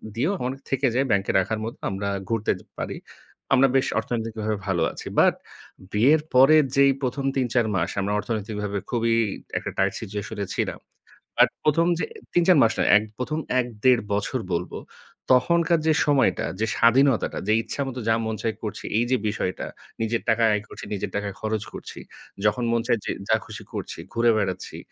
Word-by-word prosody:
দিয়েও 150 +12 +1
অনেক 135 +1 -5
থেকে 135 +1 0
যায় 135 +2 +2
ব্যাংকে 100 -2 +2
রাখার 105 +4 -1
মতো 115 - -6
আমরা 100 +1 -3 0.2
ঘুরতে 115 -2 +1
এ - - -12
পারি। - - -3 0.6
আমরা 135 +2 +6
বেশ 135 - +3
অর্থনৈতিকভাবে 110 -2 -3
ভালো 90 -3 +1
আছি। - - -9
বাট - - +6 0.6
বিয়ের 140 +9 +4
পরের 145 +5 +7
যেই 140 0 +6
প্রথম 135 +1 -2
৩, 130 - +2
৪ 120 -2 +3
মাস 85 -2 0
আমরা 100 +1 -1
অর্থনৈতিকভাবে 105 -2 -3
খুবই 115 -2 +1 0.4
একটা - - -3
টাইট - - +2
সিচুয়েশন 105 +1 -6
এ - - -3
ছিলাম। - - -2 0.6
আর - - +8 0.2
১ম 165 +3 +3
যে - - 0 0.3
৩, 175 - +4
৪ 185 -3 +7
মাস 115 - +4
না, - - +3 0.4
১ম 155 +5 -2 0.2
১-১.৫ 120 0 +2
বছর 105 +5 -1
বলব, 85 +1 -2 0.6
তখনকার 170 +5 +3
যে 160 - +5
সময়টা 145 -3 +2
যে 110 - +2
স্বাধীনতাটা 130 +1 +3
যে 110 - +4
ইচ্ছামত 135 +1 -4
যা 110 - +4
মন 110 0 -2
চায় 115 -2 -1
করছি 105 - -5
এই 120 - +2
যে 130 - +4
বিষয়টা 100 -3 -2 0.4
নিজের 115 +1 0
টাকা 115 +1 +3
আয় 105 0 +1
করছি, - - -9
নিজের 100 - -3
টাকা 100 0 -1
খরচ 110 -1 -1
করছি। - - -8 0.5
যখন 105 +4 +2
মন 115 0 +2
চায় 120 -3 +2
যে - - -1 0.2
যা 110 - +5
খুশি - - -9
করছি, - - -5
ঘুরে 115 0 +4
বেড়াচ্ছি, 95 -3 -3
115 Hz, 180 wpm, -24 LUFS, 105-135 Hz, 0.6 s, আর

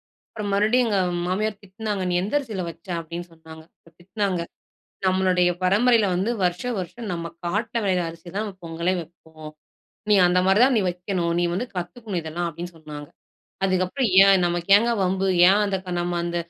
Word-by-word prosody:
அப்புறம் 210 -2 -7
மறுபடியும் 220 +5 +3
எங்க 205 - +1 0.3
மாமியார் 205 +3 -1
திட்னாங்க. 200 0 -4
"நீ - - 0
எந்த 205 +8 -4
அரிசியில 220 -9 -4
வச்ச?" 170 +3 -14
அப்படின்னு 170 +1 -7
சொன்னாங்க, 160 0 -13 0.3
அப்ப - - -18
திட்னாங்க. 190 -1 -2 0.6
"நம்மளுடைய 185 -1 +3
பரம்பரையில 215 +3 +4
வந்து 195 +6 0
வருஷ 180 0 0 0.2
வருஷம் 205 +5 -6
நம்ம 170 -1 -5
காட்ல 210 +7 -2
வெளையிற 185 -2 +1
அரிசி 165 +1 -11
தான் 215 0 -2
பொங்கலே 170 +2 -1
வெப்போம். 160 -2 -13 0.6
நீ 210 - +6
அந்த 180 +1 +2
மாதிரி 195 +5 +4
தான் 265 -1 +3
நீ 215 - +3
வைக்கணும், 180 -1 -2
நீ - - +2
வந்து 235 +8 -2
கத்துக்கணும் 185 +2 -4
இதெல்லாம்" 170 +2 -3
அப்டின்னு 170 +2 -8
சொன்னாங்க. 150 -2 -9 0.6
அதுக்கப்புறம் 185 +6 0 0.2
ஏன் 195 -2 +5
நமக்கு 175 +1 -2
ஏங்க 235 +2 0
வம்பு, 190 +1 0 0.2
ஏன் 205 +2 +4
அந்த 200 -1 0
க - - -5
நம்ம 175 0 -1
அந்த 175 0 -3
185 Hz, 170 wpm, -23 LUFS, 170-205 Hz, 0.6 s, நீ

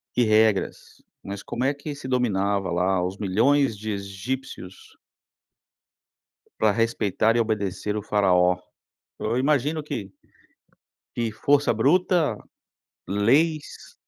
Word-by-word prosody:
e 125 - +3
regras, 110 -2 +1 0.2
mas 100 0 -7
como 125 - -3
é 140 - +2
que 145 +1 -7
se 140 -2 -8
dominava 100 -7 0
lá 90 +1 +1
os 95 +2 -5
milhões 115 +5 +2
de 110 +2 -4
egípcios. 100 0 -6 1.6
Pra 110 - +4
respeitar 115 0 +1
e - - +3
obedecer 105 -2 -1
o 105 - -2
faraó, 90 -4 +3 0.6
eu 115 +2 -1
imagino 145 +3 +1
que 120 -10 -5 1.1
que 115 -2 -1
força 140 +5 +2
bruta, 175 - +3 0.9
leis. 145 - 0
110 Hz, 110 wpm, -24 LUFS, 100-135 Hz, 1.6 s, Pra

